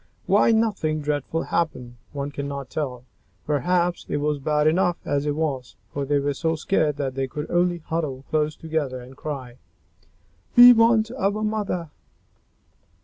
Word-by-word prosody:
Why - - +4
nothing 210 -9 +1
dreadful 150 +2 -2
happened, 125 -8 -2
one 140 0 -4
cannot 140 -2 -5
tell. 125 -5 -4 0.4
Perhaps 175 +4 0
it - - 0
was 150 0 -1
bad 150 +1 +1
enough 175 +2 +2
as 145 +1 0
it 145 - 0
was, 140 -6 -3 0.2
for 140 -1 -2
they 145 +1 +1
were 140 0 0
so 160 +3 -1
scared 155 -2 0
that 135 -2 -2
they 135 0 -2
could 150 +3 -6
only 175 0 +2
huddle 145 -5 -3
close 155 -1 +1
together 155 -5 -3
and 125 +2 -12
cry, 130 -4 -6 1.0
"We 245 0 +11
want 225 -1 +4
our 215 -3 -1
mother." 205 -7 -2
150 Hz, 150 wpm, -24 LUFS, 140-175 Hz, 1.0 s, We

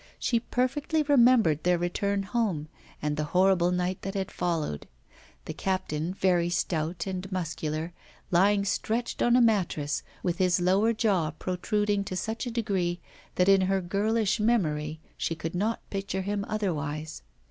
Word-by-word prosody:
She 235 - +1
perfectly 275 +6 0
remembered 245 - +4
their 180 0 +3
return 200 +3 -1
home 195 -8 -1 0.3
and 150 0 0
the 150 - -1
horrible 185 -2 +4
night 180 +1 -1
that 195 +1 -5
had 195 0 -2
followed; 160 - -2 0.6
the - - -5
captain, 180 -4 -2
very 175 -3 +2
stout 170 -1 -1
and 190 0 -5
muscular, 165 -2 -3 0.4
lying 200 +3 +4
stretched 225 +4 -1
on 240 0 +4
a 250 - +5
mattress, 180 -10 +1 0.2
with 175 +1 -1
his 180 -1 +3
lower 190 +5 +3
jaw 200 -8 +1
protruding 200 +5 -1
to 185 - -4
such 220 +6 -3
a - - -1
degree 195 -7 -1 0.4
that 180 - +3
in 195 -1 +6
her 190 +1 +2
girlish 210 +4 0
memory 155 -9 0 0.2
she 165 - -1
could 160 +1 -5
not 210 +6 -2
picture 195 -1 -3
him 200 +1 -2
otherwise. 155 -7 -3
190 Hz, 150 wpm, -28 LUFS, 170-210 Hz, 0.6 s, in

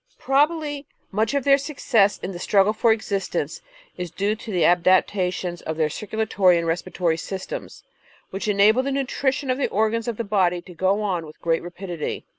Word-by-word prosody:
Probably 290 +1 0 0.2
much 220 +6 0
of 280 - +1
their 275 +1 +5
success 250 -8 +1
in 190 - -5
the 175 - -7
struggle 200 +2 +3
for 225 +1 +3
existence 210 -3 -2 0.4
is 180 -1 -4
due 200 +5 -1
to 220 0 -9
the 180 -4 +2
adaptations 180 0 +2
of 160 0 -4
their 155 -2 +1
circulatory 205 -3 +1
and 170 - -1
respiratory 165 0 -1
systems, 190 +2 -6 0.5
which 195 +3 -4
enable 210 +4 +4
the 275 +1 -2
nutrition 270 0 -1
of 255 - -1
the - - 0
organs 220 +2 0
of 235 -3 -3
the 230 - -2
body 190 -4 +1
to 180 - -12
go 190 +4 +1
on 185 -5 -1
with 155 - -14
great 165 -1 0
rapidity. 175 -2 -5
200 Hz, 180 wpm, -23 LUFS, 180-230 Hz, 0.5 s, their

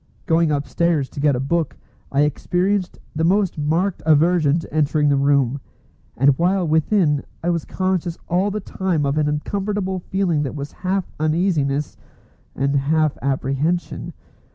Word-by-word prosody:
Going 165 0 +3
upstairs 145 0 0
to - - -8
get 145 -1 +3
a - - -2
book, 155 +3 -1 0.3
I 140 - +2
experienced 180 +5 0 0.2
the 160 - 0
most 190 -1 +2
marked 165 +6 0
aversion 155 0 +3
to 165 - -7
entering 150 -1 +2
the 140 - +3
room, 140 -1 +2 0.6
and 135 +1 +4
while 180 +1 +2
within 155 -1 +2 0.2
I 175 - +1
was 170 -3 -2
conscious 185 -3 -1
all 185 +4 +1
the 210 +1 -3
time 185 -6 -1
of 140 +2 0
an 150 -1 +1
uncomfortable 190 +5 -2
feeling 180 -4 0
that 145 0 -3
was 140 0 -5
half 185 0 -2
uneasiness 155 -3 0 0.6
and 140 +2 0
half 155 +2 +1
apprehension. 140 +6 -1
160 Hz, 150 wpm, -21 LUFS, 145-180 Hz, 0.6 s, and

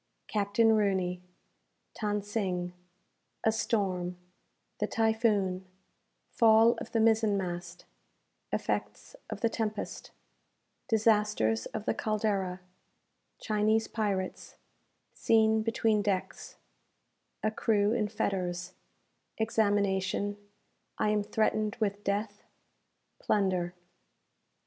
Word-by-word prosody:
Captain 215 +2 +2
Rooney 190 -4 +1 0.8
Than 210 -1 0
Sing 185 -4 -2 0.7
A 220 - +4
Storm 185 -5 -1 0.6
The - - 0
Typhoon 215 -5 +1 0.6
Fall 225 -1 +6
of - - -8
the 225 - +1
Mizen 220 -2 +3
mast 175 -2 -5 0.7
Effects - - -3
of - - -6
the 230 - +4
Tempest 215 -1 -4 0.8
Disasters 210 - +2
of 210 - -6
the - - +1
"Caldera" 200 -4 -1 0.8
Chinese 215 +1 +1
Pirates 200 -4 -3 0.6
Scene 220 -1 +3
between 220 -1 +1
Decks 200 -3 -3 0.9
A 215 - +2
Crew 210 -1 +2
in 220 -3 +1
Fetters 180 -4 -2 0.6
Examination 205 -2 +1 0.6
I 215 - +1
am 210 0 +2
threatened 215 0 0
with 205 -2 -1
Death 205 +1 -2 0.8
Plunder. 185 -3 0
210 Hz, 90 wpm, -30 LUFS, 190-220 Hz, 0.9 s, Fall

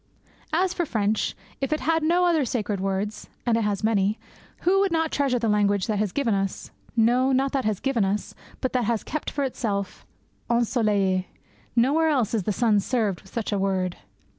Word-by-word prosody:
As 360 +3 +2
for 350 - -1
French, 215 -7 0 0.2
if 270 - -2
it 305 - 0
had 325 0 +2
no 345 +3 +3
other 330 -4 +3
sacred 215 -5 -2
words 195 +2 -3 0.2
and 235 -2 +3
it 230 - +1
has 205 -1 -1
many 210 -1 +2 0.4
who 380 +2 +3
would 395 -2 +2
not 320 -1 +1
treasure 275 -3 +1
the 230 -1 -1
language 205 -2 +2
that 215 -3 -1
has 210 -3 0
given 255 -3 0
us 195 -1 -2 0.3
no, 245 +4 +4
not 270 +1 +2
that 270 -4 -1
has 215 -3 0
given 270 -6 +1
us, 195 +1 -1 0.3
but 260 - -1
that 250 -3 +1
has 230 -1 0
kept 310 - -3
for 285 - -2
its 260 -1 -4
own 200 -3 +1 0.6
ensoleille? 210 -6 +2 0.5
Nowhere 285 +7 +3
else 260 -9 +1
is 210 -6 0
the - - +1
sun 215 -1 +3
served 210 -4 -1
with 190 - -18
such 230 -2 -3
a 205 - 0
word. 185 -2 0
230 Hz, 200 wpm, -25 LUFS, 205-275 Hz, 0.6 s, no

